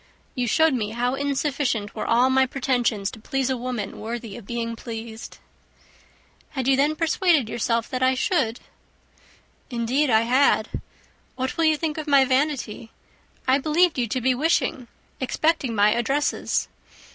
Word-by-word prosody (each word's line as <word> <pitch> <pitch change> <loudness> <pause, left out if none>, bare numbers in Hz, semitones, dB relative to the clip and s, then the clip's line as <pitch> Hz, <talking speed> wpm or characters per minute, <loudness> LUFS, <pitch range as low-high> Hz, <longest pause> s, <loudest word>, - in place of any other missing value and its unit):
You 250 -2 -1
showed 320 +4 +3
me 220 -4 -2
how 245 +2 0
insufficient 275 -5 -1
were - - -4
all 245 +3 +4
my 265 0 +4
pretensions 245 -6 0
to - - -11
please 270 +3 -1
a - - +1
woman 240 -5 -4
worthy 225 -1 -6
of 210 - -11
being 230 -1 -3
pleased." 225 -1 -8 1.1
"Had 265 -4 -3
you 270 - +5
then 290 +3 +2
persuaded 330 - +2
yourself 230 0 -1
that 255 -1 -2
I 260 0 +3
should?" 255 -5 0 1.1
"Indeed 250 +4 0
I 220 -2 +5
had. 255 +5 +2 0.5
What 260 0 -3
will 330 - +1
you 315 -1 +3
think 315 0 -2
of 310 - -6
my 280 -2 +5
vanity? 260 -5 -1 0.6
I 260 +2 +4
believed 315 +1 +2
you 240 - 0
to 255 +3 -2
be 260 +2 +3
wishing, 270 -3 0 0.3
expecting 270 -2 0
my 205 0 +4
addresses." 270 +5 0
255 Hz, 155 wpm, -24 LUFS, 230-285 Hz, 1.1 s, you